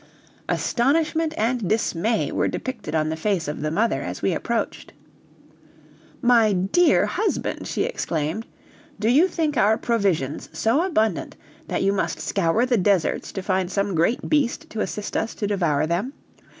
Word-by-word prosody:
Astonishment 315 +5 +1
and 230 -2 0
dismay 220 0 0
were - - +1
depicted 235 -10 -4
on 155 -1 +1
the 160 - -2
face 175 -1 -1
of 150 - -4
the 155 - -1
mother 215 +9 +1
as - - -6
we - - +2
approached. - - -3 1.3
"My 230 -4 +5
dear 195 - +3
husband," 440 - -2
she - - -1
exclaimed, 170 - -2 0.5
"do 215 - 0
you 290 +10 +5
think 315 -5 -1
our 215 +1 +4
provisions 195 - -1
so 235 +8 +1
abundant 220 - 0 0.3
that - - -1
you 195 +1 +3
must 200 - -1
scour 195 +5 +1
the 250 -2 +2
deserts 190 -3 +1
to 190 - -4
find 185 -2 0
some 200 0 0
great 170 +9 +1
beast 290 -6 0
to 215 - -3
assist 210 0 -4
us 225 - -1
to 210 - -3
devour 170 -8 +1
them. 180 - -2
210 Hz, 155 wpm, -23 LUFS, 180-245 Hz, 1.3 s, My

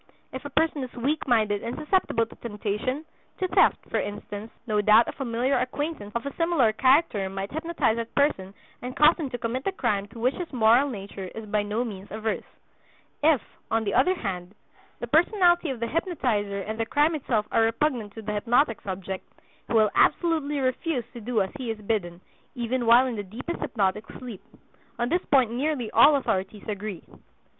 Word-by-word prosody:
If 260 - -6
a - - -4
person 300 -1 +1
is 255 - -6
weak 280 +6 -1
minded 215 -4 +2
and 235 - -4
susceptible 305 -7 +1
to - - -15
temptation, 230 +6 -3 0.3
to 375 - 0
theft, - - +3
for - - -1
instance, 205 +1 -6 0.2
no 210 -3 +1
doubt 215 +3 +6
a - - -2
familiar 250 +1 0
acquaintance 255 -3 -3
of 235 - -2
a 280 - -4
similar 330 -10 +3
character 255 - +3
might 195 +1 -5
hypnotize 315 -7 0
that 230 0 -5
person 200 -10 +1 0.3
and 250 +1 -6
cause 305 +3 +6
him 300 -5 -3
to 245 - -4
commit 240 +2 -3
the 390 - 0
crime 205 - -1
to 225 - -14
which 250 +4 +2
his 355 -2 -6
moral 245 +2 +4
nature 200 -4 -7
is 225 0 -6
by 210 0 0
no 210 +3 -1
means 200 -3 -8
averse. 220 +1 -2 0.8
If, 295 -5 +4 0.3
on 225 +1 +1
the 200 - -2
other 370 +1 +4
hand, 190 - -5 0.4
the - - -3
personality 345 - +3
of 260 -3 -4
the 235 - -1
hypnotizer 230 - -1
and 220 +3 -5
the 225 - +1
crime 295 +5 +3
itself 240 -8 0
are - - +3
repugnant 225 -2 0
to 225 - -8
the 210 0 -3
hypnotic 230 +2 +2
subject, 190 0 -6 0.4
he - - -4
will 215 -2 +4
absolutely 315 -4 +2
refuse 260 +1 -1
to 240 - -8
do 220 -2 +1
as 190 - -6
he 250 -3 -4
is 225 - -2
bidden, 190 -5 -2 0.3
even 240 0 -1
while 240 +3 +7
in 245 -4 -3
the - - -2
deepest 225 - -6
hypnotic 205 -1 -1
sleep. 240 -7 -8 0.6
On 240 0 -1
this 350 +4 +1
point 260 -5 +4
nearly 255 -2 -1
all 295 +1 +7
authorities 195 -6 -2
agree. 205 -3 -5
235 Hz, 190 wpm, -26 LUFS, 210-280 Hz, 0.8 s, while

